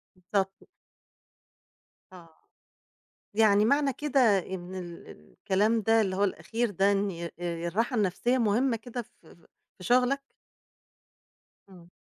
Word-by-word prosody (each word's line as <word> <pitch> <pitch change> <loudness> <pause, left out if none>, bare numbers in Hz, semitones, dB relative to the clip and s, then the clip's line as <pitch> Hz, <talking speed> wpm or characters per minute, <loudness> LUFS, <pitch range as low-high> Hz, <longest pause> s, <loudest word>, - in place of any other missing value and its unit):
بالضبط. 190 +1 -3 1.5
آه. 165 -3 -15 1.0
يعني 210 -1 +4
معنى 280 +1 +2
كده 280 0 0 0.2
إن 185 0 -7
ال 175 -2 -8
الكلام 205 - -1
ده 225 +2 +3
اللي 190 -2 -1
هو 200 - +1
الأخير 225 +4 -1
ده 195 +1 +2
إن 190 -4 -2
الراحة 175 +8 -2
النفسية 215 +5 +1
مهمة 230 +2 +1
كده 245 +2 -6
في - - -18
ف - - -23 0.5
في 185 - -12
شغلك؟ 255 +6 +1 1.4
إمم. 175 -2 -16
205 Hz, 115 wpm, -28 LUFS, 185-235 Hz, 1.5 s, يعني